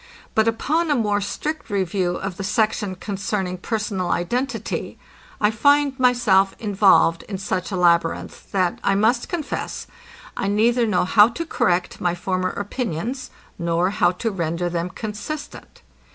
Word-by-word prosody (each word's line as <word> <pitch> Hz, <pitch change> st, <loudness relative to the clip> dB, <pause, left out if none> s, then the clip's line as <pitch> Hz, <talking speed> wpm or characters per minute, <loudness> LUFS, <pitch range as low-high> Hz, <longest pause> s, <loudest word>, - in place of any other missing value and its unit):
But 220 Hz, 0 st, +3 dB
upon 310 Hz, +9 st, +1 dB
a 295 Hz, -, +3 dB
more 210 Hz, -4 st, +1 dB
strict 300 Hz, +7 st, -4 dB
review 185 Hz, -2 st, 0 dB
of 195 Hz, -2 st, -5 dB
the -, -, -4 dB
section 210 Hz, -1 st, 0 dB
concerning 190 Hz, -1 st, -3 dB
personal 200 Hz, -3 st, -2 dB
identity, 245 Hz, +12 st, -2 dB, 0.4 s
I 210 Hz, 0 st, +3 dB
find 285 Hz, +3 st, +3 dB
myself 240 Hz, -7 st, +3 dB
involved 190 Hz, -6 st, +4 dB
in 195 Hz, -, -3 dB
such 185 Hz, -1 st, -2 dB
a -, -, -1 dB
labyrinth, 170 Hz, -2 st, +1 dB
that, 185 Hz, -3 st, 0 dB
I 195 Hz, -, +2 dB
must 230 Hz, +4 st, +2 dB
confess, 335 Hz, -5 st, -4 dB, 0.5 s
I 195 Hz, -, -2 dB
neither 230 Hz, +4 st, +2 dB
know 185 Hz, -4 st, +2 dB
how 210 Hz, +3 st, +6 dB
to 335 Hz, +8 st, -5 dB
correct 180 Hz, -, 0 dB
my 175 Hz, -1 st, +1 dB
former 185 Hz, +1 st, -1 dB
opinions, 225 Hz, -, -4 dB, 0.3 s
nor 170 Hz, +2 st, +1 dB
how 200 Hz, -, +3 dB
to 225 Hz, +5 st, -2 dB
render 170 Hz, -1 st, -2 dB
them 170 Hz, +1 st, -2 dB
consistent. 220 Hz, +10 st, -7 dB
200 Hz, 145 wpm, -22 LUFS, 180-230 Hz, 0.5 s, how